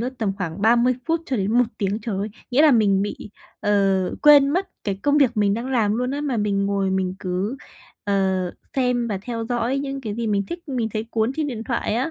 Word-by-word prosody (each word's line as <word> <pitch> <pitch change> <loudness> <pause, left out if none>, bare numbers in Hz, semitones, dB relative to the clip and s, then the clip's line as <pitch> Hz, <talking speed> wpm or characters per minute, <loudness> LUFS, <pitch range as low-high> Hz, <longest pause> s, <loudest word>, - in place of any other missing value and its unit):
lướt 245 +2 -2
tầm 210 -4 0
khoảng 185 0 -4
30 240 +3 +4
phút 330 0 +1
cho 260 - -1
đến 200 0 -1
1 245 +1 +4
tiếng, 200 +1 -1
trời 210 -4 -3
ơi, 205 +2 -2 0.2
nghĩa 260 +4 +4
là 310 - +7
mình 205 -6 +3
bị, 205 0 -5 0.3
ờ, 195 -2 +1
quên 290 -2 +7
mất 365 +6 0 0.2
cái 200 - -1
công 290 +1 +3
việc 250 -5 +3
mình 205 -1 +2
đang 230 +3 -4
làm 225 -6 +1
luôn 250 +1 -1
á, 285 +2 -3
mà 285 -4 -1
mình 200 -2 0
ngồi 200 -1 0
mình 190 -1 -1
cứ, 185 +7 -2 0.5
ờ, 200 - 0 0.6
xem 250 -2 +1
và 200 -3 -2
theo 230 0 -4
dõi 245 +2 0
những 275 -1 -4
cái 215 -5 -4
gì 230 +1 -3
mình 205 -2 +1
thích, 345 - -8
mình 245 -5 -1
thấy 215 0 -2
cuốn 225 +2 0
trên 310 -1 0
điện 240 -6 -4
thoại 235 -3 -1
á. 255 +7 -1
230 Hz, 240 wpm, -22 LUFS, 200-260 Hz, 0.6 s, là